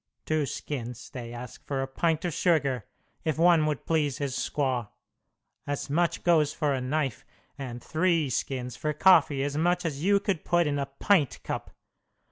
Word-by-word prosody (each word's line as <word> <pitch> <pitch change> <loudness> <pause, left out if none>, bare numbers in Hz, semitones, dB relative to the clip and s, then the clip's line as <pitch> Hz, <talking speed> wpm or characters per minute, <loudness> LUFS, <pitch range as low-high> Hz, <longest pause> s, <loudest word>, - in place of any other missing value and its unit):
Two 155 -2 0
skins 120 -6 -5
they 120 -3 -7
ask 120 0 -9
for 135 -2 -1
a - - -4
pint 160 +5 0
of 175 - -1
sugar, 140 - +1 0.4
if 155 -2 -1
one 165 -2 +5
would 150 -3 -2
please 150 -5 +1
his 140 -3 -2
squaw. 130 -6 -1 0.8
As 145 0 -3
much 170 +3 +1
goes 155 -4 +4
for 150 -2 0
a 130 - -1
knife; 135 -1 -1 0.3
and 125 -4 -7
three 165 -2 +1
skins 125 -1 -2
for 150 +4 -2
coffee 150 -5 +5
as 145 0 -2
much 175 +2 +1
as 150 -2 -3
you 200 +2 +4
could 195 -5 -2
put 175 0 +2
in 145 -1 0
a 140 - -2
pint 145 - +1
cup. - - -4
145 Hz, 175 wpm, -28 LUFS, 135-165 Hz, 0.8 s, one